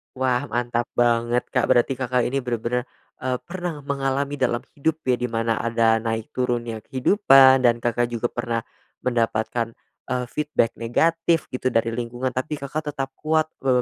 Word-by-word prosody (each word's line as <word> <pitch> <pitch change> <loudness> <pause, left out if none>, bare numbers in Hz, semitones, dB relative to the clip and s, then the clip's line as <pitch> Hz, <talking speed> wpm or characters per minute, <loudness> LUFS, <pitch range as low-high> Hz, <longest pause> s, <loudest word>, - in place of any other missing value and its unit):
Wah 130 -1 0
mantap 120 0 -1
banget, 120 0 +2
Kak. - - +1
Berarti 120 +3 +3
Kakak 125 -1 0
ini 135 +2 0
bener-bener, 125 0 -2 0.3
eee, 130 -1 -1
pernah 175 -5 -5
mengalami 140 0 -1
dalam 120 -2 +1 0.2
hidup 160 +2 0
ya 130 -1 +2
di 125 - -1
mana 115 -1 -1
ada 115 -1 +2
naik 115 +4 -3
turunnya 120 -3 -2
kehidupan 135 - +5
dan 120 0 +3
Kakak 120 0 +1
juga 120 0 -2
pernah 115 -1 -2 0.4
mendapatkan, 115 -1 0 0.3
eee, 125 -1 -1
feedback 150 -6 0
negatif 165 +7 +1
gitu 130 0 -2
dari 115 -1 +1
lingkungan. 120 +2 -3
Tapi 150 +4 -2
Kakak 150 +2 -4
tetap 135 0 -3
kuat, 155 0 +1 0.2
eee, 125 -2 +4
125 Hz, 155 wpm, -23 LUFS, 120-135 Hz, 0.4 s, kehidupan